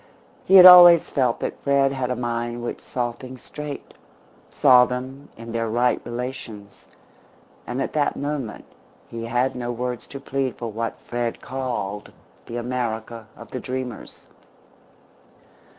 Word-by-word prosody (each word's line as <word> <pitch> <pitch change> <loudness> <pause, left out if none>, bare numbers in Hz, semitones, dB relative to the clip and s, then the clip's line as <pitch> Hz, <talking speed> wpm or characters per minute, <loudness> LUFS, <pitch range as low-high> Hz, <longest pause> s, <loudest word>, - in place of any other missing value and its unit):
He 190 - +4
had 185 -1 +10
always 175 -2 +9
felt 125 -4 0
that - - -5
Fred 140 -1 +2
had 130 -2 -3
a 125 - -1
mind 120 0 -4
which 120 - -5
saw 120 -2 -3
things 130 +1 -12
straight, 150 -2 -8 0.6
saw 125 -1 +5
them 130 +3 -7
in 115 0 -9
their 115 -1 -2
right 120 +2 +1
relations, 120 -4 -8 0.8
and 125 +2 -4
at 135 - -3
that 150 -2 0
moment 140 -6 -5 0.4
he 115 0 -7
had 125 +3 0
no 120 -1 -4
words 125 0 -5
to 140 - -9
plead 135 -2 -3
for 115 -2 -6
what 115 +2 -4
Fred 120 -1 -4
called 120 -6 -5 0.4
the 120 - -6
America 115 -2 -4
of 115 - -13
the 130 - -4
dreamers. 125 -1 -7
125 Hz, 145 wpm, -23 LUFS, 115-135 Hz, 0.8 s, had